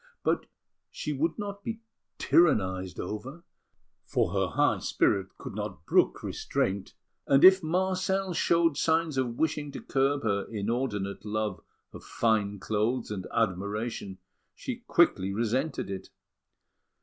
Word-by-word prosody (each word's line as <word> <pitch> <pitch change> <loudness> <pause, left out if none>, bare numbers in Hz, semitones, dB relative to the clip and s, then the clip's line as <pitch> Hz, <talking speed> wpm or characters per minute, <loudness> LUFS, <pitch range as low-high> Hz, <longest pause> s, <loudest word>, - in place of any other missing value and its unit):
But - - 0 0.4
she 150 - -4
would 155 +4 0
not 200 -1 -5
be 225 0 -5 0.4
tyrannised 95 - +2
over, 125 - -6 0.6
for - - 0
her - - +1
high - - +2
spirit 95 -1 0
could - - -8
not - - -6
brook - - +2
restraint; 95 0 -2 0.3
and 135 0 +4
if 190 0 +9
Marcel 185 +2 0
showed 165 -3 +2
signs 160 -2 +1
of 120 -3 -1
wishing 150 -2 -1
to - - -5
curb 140 +1 0
her 100 -2 0
inordinate 105 -2 -2
love 105 -2 -2 0.3
of - - -10
fine 105 -3 0
clothes 110 +4 -1
and 95 -3 -4
admiration, 100 0 -2 0.4
she 255 -3 -5
quickly 100 - +3
resented 120 +4 -1
it. 95 - -6
120 Hz, 125 wpm, -28 LUFS, 100-165 Hz, 0.6 s, if